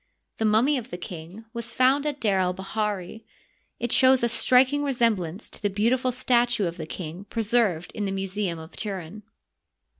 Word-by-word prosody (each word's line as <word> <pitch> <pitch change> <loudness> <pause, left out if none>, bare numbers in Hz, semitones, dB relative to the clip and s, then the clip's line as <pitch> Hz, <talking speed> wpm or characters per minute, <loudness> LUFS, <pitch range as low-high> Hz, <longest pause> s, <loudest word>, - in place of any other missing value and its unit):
The 220 - +1
mummy 240 +7 +3
of 240 +1 -11
the 175 - -6
king 175 +5 -9
was 235 -1 -5
found 270 +3 +3
at 290 -1 -2
D6r 200 -6 +2
el 180 0 +1
bahiri. 205 +1 -3 0.6
It 240 - -2
shows 260 -1 +5
a 235 - +3
striking 260 +4 +3
resemblance 225 - 0
to - - -7
the 205 - +1
beautiful 235 +6 +1
statue 240 -3 +2
of 170 0 -4
the 160 -2 -6
king 175 +3 -7
preserved 215 -7 +1
in 210 - -3
the 195 - -2
Museum 195 -2 -2
of 160 0 -11
Turin. 195 -1 -5
215 Hz, 175 wpm, -25 LUFS, 185-245 Hz, 0.6 s, shows